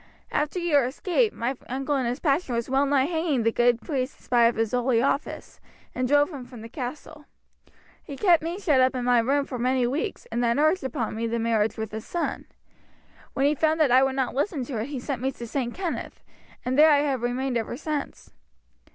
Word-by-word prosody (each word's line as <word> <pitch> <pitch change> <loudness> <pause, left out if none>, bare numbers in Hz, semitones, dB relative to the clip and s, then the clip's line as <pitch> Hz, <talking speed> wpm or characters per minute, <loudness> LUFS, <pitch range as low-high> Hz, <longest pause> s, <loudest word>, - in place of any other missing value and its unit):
After 300 +4 -1
your 310 -7 +2
escape 370 - 0
my 245 +4 -3
uncle 270 +3 -1
in 260 -3 0
his 245 +3 -2
passion 280 -4 0
was 235 0 -2
well 275 +1 +3
nigh 275 -1 +3
hanging 320 -6 0
the 230 - +2
good 240 0 +3
priest 270 -3 -3
in - - -25
spite 240 -1 +3
of 235 - 0
his 225 -1 0
holy 245 -1 +2
office, 275 +3 -2 0.3
and 255 0 -1
drove 290 +4 +3
him 275 -5 -7
from 245 -2 -12
the 225 - -9
castle. 295 +4 -7 0.8
He 285 - -8
kept 350 -3 +4
me 335 +3 -4
shut 300 -10 +3
up 260 +1 +3
in 250 -1 -2
my 245 -1 +4
room 275 +5 +1
for 250 -3 -6
many 255 +1 +1
weeks, 270 +6 -3
and 240 +2 -1
then 235 +1 +2
urged 310 +4 +2
upon 265 -4 -3
me 230 +1 -2
the 230 +1 -1
marriage 225 -1 0
with 220 -1 -4
his 220 0 -6
son. 345 - -3 0.9
When 270 - +1
he 290 - +4
found 315 +2 +1
that 300 -5 +4
I 255 +1 +6
would 270 0 +1
not 260 -2 -1
listen 280 0 -1
to 235 -3 -4
it 220 - -3
he 285 -3 -5
sent 255 -1 -4
me 265 +1 0
to 240 - -8
St. 240 0 -2
Kenneth, 355 +4 -5 0.4
and 260 +3 0
there 310 +1 +8
I 290 -2 +5
have 275 -4 -1
remained 250 +2 -1
ever 230 +1 -2
since. 300 -1 -5
265 Hz, 225 wpm, -25 LUFS, 240-295 Hz, 0.9 s, there